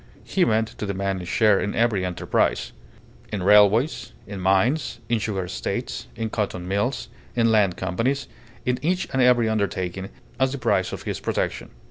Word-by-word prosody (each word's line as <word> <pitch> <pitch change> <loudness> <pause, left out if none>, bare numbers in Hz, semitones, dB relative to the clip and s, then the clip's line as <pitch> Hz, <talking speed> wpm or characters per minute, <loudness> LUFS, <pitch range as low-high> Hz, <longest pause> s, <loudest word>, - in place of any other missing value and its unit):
he 190 - +1
meant 110 -3 +2
to 105 - -6
demand 100 -1 -2
a - - -7
share 105 +1 +3
in 100 - -2
every 115 -5 +2
enterprise 90 -1 0 0.6
in 100 -4 -2
railways, 105 - +4
in 100 -1 -7
mines, 95 +11 +2
in 120 -1 +2
sugar 100 -3 -2
estates, 60 -8 -4
in 115 -1 -2
cotton 100 -5 -3
mills, 100 +8 -1 0.3
in 115 -1 +3
land 100 -5 +3
companies, 115 +10 -1 0.4
in 125 0 0
each 180 +5 0
and 130 - +2
every 125 -2 +5
undertaking 95 -3 -2 0.3
as 130 0 +2
the - - -3
price - - +1
of - - -6
his - - -3
protection. - - -2
105 Hz, 165 wpm, -24 LUFS, 95-120 Hz, 0.6 s, every